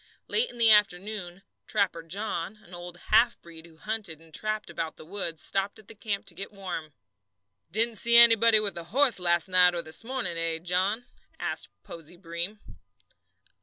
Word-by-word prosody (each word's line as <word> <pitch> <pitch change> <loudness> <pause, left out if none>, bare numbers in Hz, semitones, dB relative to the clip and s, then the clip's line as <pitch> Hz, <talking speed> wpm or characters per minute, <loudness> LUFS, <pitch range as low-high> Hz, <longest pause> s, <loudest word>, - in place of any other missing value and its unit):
Late 470 +2 +1
in - - -12
the 230 -1 +6
afternoon 195 -2 +1 0.2
"Trapper 195 -6 0
John," 190 +2 -4
an 175 - -16
old 175 0 -8 0.2
half 235 +2 +5
breed 165 -1 -13
who 160 -1 -20
hunted 210 -5 -5
and 165 -1 -20
trapped 215 +3 0
about 165 -1 -4
the - - -12
woods, 170 -3 -3
stopped 195 +2 -1
at 215 -2 -17
the - - -9
camp 210 -1 -4
to 195 - -4
get 195 +5 -7
warm. 180 -6 -6 0.8
"Didn't 225 +5 0
see 235 0 +5
anybody 230 -1 +7
with 210 -2 -1
a 170 - -8
horse 250 +4 +3
last 175 -1 +2
night 180 -1 +5
or 170 - -2
this 155 +7 -2
morning, 230 -9 -2
eh, 165 -1 0
John?" 185 +7 0 0.3
asked - - -4
Posey 170 +1 -10
Breem. 170 +3 -4
190 Hz, 175 wpm, -27 LUFS, 170-215 Hz, 0.8 s, anybody